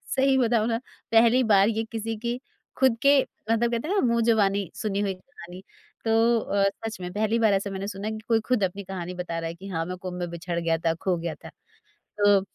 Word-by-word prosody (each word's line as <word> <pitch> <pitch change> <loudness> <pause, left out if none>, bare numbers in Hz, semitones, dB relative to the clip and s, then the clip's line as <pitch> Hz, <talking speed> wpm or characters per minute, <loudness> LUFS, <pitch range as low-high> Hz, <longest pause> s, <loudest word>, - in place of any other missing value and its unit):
सही 265 0 +3
बताऊँ 230 -3 +2
ना 225 -1 +1 0.3
पहली 235 +3 +5
बार 200 -2 +5
ये 225 0 -1
किसी 225 0 -3
की 240 +2 -3 0.4
खुद 260 -3 +3
के 280 0 +6 0.3
मतलब 235 +1 +2
कहते 235 +6 -2
हैं 400 - 0
ना - - +3
मुँह 235 0 +2
जुबानी 200 -5 +2
सुनी 200 -2 -2
हुई 195 -2 0
कहानी 185 -3 -12 0.4
तो 225 - +1 0.3
अ, 200 -2 +1 0.2
सच 220 -4 -5
में 180 - -5
पहली 220 +2 +1
बार 220 -3 +4
ऐसा 195 +1 0
मैंने 195 +1 -4
सुना 200 +1 -5
है - - -1
कि 215 - -6
कोई 225 -1 +3
खुद 250 -5 +2
अपनी 190 +2 -2
कहानी 180 -2 -6
बता 170 -2 -4
रहा 165 - -3
है 165 - -5
कि 195 +3 -10
हाँ, 165 -3 -2
मैं 180 +1 -5
कुम्भ 180 0 -6
में 175 -1 -3
बिछड़ 170 0 -4
गया 165 -1 +1
था, 165 0 0
खो 180 +2 -1
गया 165 -1 -4
था। - - -12 0.5
तो 205 -1 +2
200 Hz, 235 wpm, -26 LUFS, 180-230 Hz, 0.5 s, के